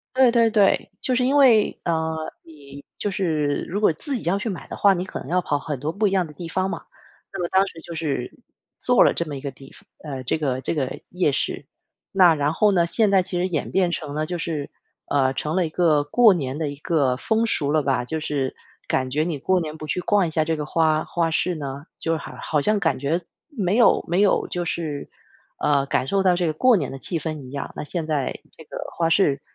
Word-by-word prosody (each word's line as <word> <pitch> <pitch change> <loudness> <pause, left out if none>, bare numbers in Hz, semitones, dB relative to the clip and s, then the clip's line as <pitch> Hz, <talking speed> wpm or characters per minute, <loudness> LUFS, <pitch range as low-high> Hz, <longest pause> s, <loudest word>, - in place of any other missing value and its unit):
对， 260 -2 +6
对， 230 -1 +4
对。 205 -3 +3
就 255 - 0
是 250 0 +2
因 270 +3 +2
为 250 -7 +5
呃， 160 -1 0 0.3
你 145 -3 -13
就 205 - -2
是 155 -7 0
如 200 +5 -3
果 210 - +5
自 270 - -5
己 240 - -4
要 185 +4 +1
去 220 - -4
买 190 -5 -4
的 - - -6
话， 200 -1 +5
你 180 -1 -2
可 190 - -6
能 - - -9
要 180 +2 +1
跑 145 -4 -1
很 145 0 -4
多 145 +5 -3
不 210 +4 +1
一 190 - -1
样 190 -2 +2
的 155 - -11
地 165 +3 -8
方 185 +3 -1
嘛。 - - -5 0.5
那 - - -5
么 175 - -2
当 190 +1 +3
时 165 -3 -10
就 170 - -9
是 145 -6 -2 0.5
做 - - +4
了 - - +4
这 170 - -1
么 150 -2 -6
一 135 - -7
个 140 - -4
地 135 +1 -15
方 - - -18 0.2
呃， 130 -2 -5
这 125 - 0
个 130 -4 -1
这 - - -2
个 135 -4 -3
夜 180 -5 +1
市， - - -2 0.5
那 180 -3 +6
然 145 0 0
后 210 +5 +3
呢， 175 -3 +3
现 200 +4 +2
在 195 - +5
其 180 0 -3
实 180 - +1
演 155 -4 -2
变 185 -2 +2
成 145 -4 -4
了 155 +1 -1
就 175 +2 -3
是 155 -4 -3 0.4
呃， 135 -2 +2
成 150 +3 -3
了 180 - +2
一 - - -3
个 155 -3 +2
过 220 +7 +5
年 140 -5 -3
的 155 -2 -2
一 145 - -7
个 140 -4 +1
风 220 - +1
俗 150 -10 0
了 155 - +2
吧。 125 -3 0
就 160 - -3
是 140 -4 -2 0.3
感 130 -1 0
觉 150 +3 +1
你 165 -4 -2
过 185 +7 +1
年 155 -2 -5
不 155 - -7
去 155 +4 -2
逛 200 +1 +2
一 165 - -3
下 155 0 +1
这 160 0 0
个 150 -1 -4
花 155 0 +2
花 170 -1 -1
市 175 +2 0
呢， 140 0 -6
就 165 0 0
好 155 - -9
好 150 -2 0
像 210 +6 +2
感 - - +1
觉 155 +6 0 0.3
没 205 - -1
有 235 0 +5
没 175 +3 +2
有 205 - +3
就 175 - -3
是， 160 -4 -4 0.5
呃， 140 -2 +2
感 130 - 0
受 195 +5 +1
到 180 -2 +3
这 175 - +1
个 155 - 0
过 240 +8 +4
年 145 -7 -2
的 135 - -7
气 170 +3 -3
氛 155 -2 -4
一 130 - -11
样。 140 -1 -5
那 - - -4
现 160 +1 -4
在 145 -4 -1 0.2
这 - - -11
个 - - -9 0.2
花 165 -1 +2
市 145 -6 +3
165 Hz, 270 characters per minute, -23 LUFS, 145-185 Hz, 0.5 s, 对